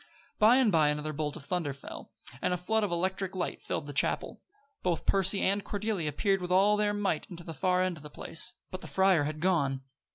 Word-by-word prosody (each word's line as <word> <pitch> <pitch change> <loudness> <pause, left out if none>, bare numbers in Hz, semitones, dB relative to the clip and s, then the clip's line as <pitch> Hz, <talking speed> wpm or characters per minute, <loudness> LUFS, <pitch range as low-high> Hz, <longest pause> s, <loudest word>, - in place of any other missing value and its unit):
By 220 +3 +7
and 255 -5 +4
by 155 -4 +4
another 150 +1 -2
bolt 150 0 -2
of 155 -5 -10
thunder 170 -5 -1
fell, 140 - -10 0.3
and 180 - +1
a - - -3
flood 220 +5 0
of 200 - -1
electric 190 +2 -1
light 180 -2 -3
filled 145 - -3
the 145 - -7
chapel. - - 0 0.4
Both 175 -3 -1
Percy 195 0 +2
and 200 +1 +2
Cordelia 205 -7 -2
peered 195 +6 +1
with 180 0 -4
all 195 +3 +5
their 210 0 +1
might 200 -6 -1
into 175 -1 -8
the 165 - -7
far 180 +4 +2
end 185 -2 -1
of - - -12
the 150 - -9
place; 165 +3 -3 0.2
but 185 - -6
the - - -8
friar 190 -6 +3
had 155 +1 -4
gone! 145 -7 +1
180 Hz, 225 wpm, -30 LUFS, 155-195 Hz, 0.4 s, By